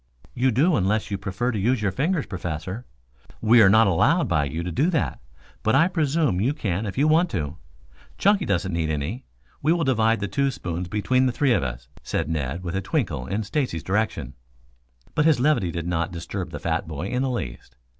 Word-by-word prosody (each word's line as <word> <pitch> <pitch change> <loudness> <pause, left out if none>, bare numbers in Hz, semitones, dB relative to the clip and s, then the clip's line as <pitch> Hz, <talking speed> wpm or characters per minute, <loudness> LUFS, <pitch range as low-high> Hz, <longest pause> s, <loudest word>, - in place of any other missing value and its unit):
"You 130 +2 +2
do, 150 +9 +3
unless 105 +2 0
you 100 - -2
prefer 100 +6 -2
to 110 - -2
use 115 +3 +1
your 100 - +1
fingers, 150 - 0
Professor. 90 +5 -5 0.5
We 115 +1 +6
are 95 - +7
not 110 +3 +6
allowed 115 - +3
by 75 -2 +1
you 80 +4 -4
to 90 - -4
do 145 - +2
that, 160 - -1 0.4
but 110 - +2
I 165 - +5
presume 150 - +1
you 135 +7 +1
can 105 - -2
if 100 - -6
you 145 +3 +3
want 165 +3 +4
to. 80 -3 -3 0.6
Chunky 200 -2 +3
doesn't 95 -3 0
need 80 -2 -1
any. 80 - -3 0.4
We 155 +4 +3
will 170 -1 0
divide 115 -4 +2
the 100 - -2
two 140 +6 +1
spoons 90 -7 -4
between 130 +7 +1
the - - +1
three 130 +1 +2
of - - +2
us," - - -5
said - - -2
Ned, 75 +2 -2
with 85 0 -4
a 95 - 0
twinkle 90 - -2
in 100 +4 -2
Stacy's 105 - -2
direction. 95 - -1 0.8
But 150 -1 +2
his 155 -6 +4
levity 135 - +2
did 85 0 -4
not 85 -1 -1
disturb 85 -1 -5
the - - -6
fat - - -2
boy 80 +1 -5
in 125 0 -1
the 135 - 0
least. 60 - -5
105 Hz, 210 wpm, -24 LUFS, 85-135 Hz, 0.8 s, are